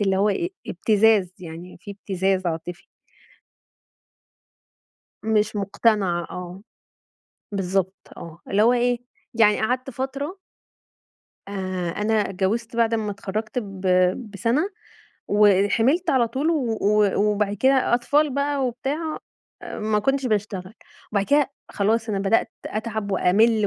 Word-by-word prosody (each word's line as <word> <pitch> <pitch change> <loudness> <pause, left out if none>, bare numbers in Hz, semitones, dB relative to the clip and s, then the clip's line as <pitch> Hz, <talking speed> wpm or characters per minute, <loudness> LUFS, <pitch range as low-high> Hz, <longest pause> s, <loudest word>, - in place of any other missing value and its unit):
اللي 195 -2 +2
هو 200 +2 +3
إيه، 345 - -1 0.2
إبتزاز، 205 -1 +3
يعني 175 0 -9
في 205 - -9
إبتزاز 190 -1 -1
عاطفي. 170 +1 -4 2.4
مش 215 -1 +1
مُقتنعة 200 -3 +1
آه. 180 +2 -7 0.9
بالضبط 190 -1 -2
آه. 170 0 -10
اللي 200 - +2
هو 240 +2 +5
إيه، 245 0 +1 0.3
يعني 220 -3 +4
قعدت 250 +4 -1
فترة 275 - -4 1.1
آآ 185 -3 -3
أنا 210 +2 0
اتجوّزت 220 +5 -2
بعد 230 -1 +2
أمّا 215 -2 -1
اتخرّجت 210 +4 -4
ب 195 -5 -6 0.5
بسَنة 235 - 0 0.6
وحِمِلت 210 - +3
على 245 -3 +3
طول 280 +7 0
و 260 -9 0
و 210 -1 +3
وبعد 205 0 +1
كده 265 +2 +3
أطفال 285 +5 +2
بقى 280 -1 0
وبتاع، 285 +6 -3 0.4
آآ - - -7
ما 215 0 +1
كنتش 270 +4 0
باشتغل. 205 -3 -2 0.4
وبعد 200 -1 +1
كده 285 -1 +3 0.2
خلاص 220 +3 0
أنا 200 -2 -1
بدأت 200 +3 +1
أتعب 220 -2 -3
وأمِل 215 +4 +3
210 Hz, 120 wpm, -23 LUFS, 195-240 Hz, 2.4 s, هو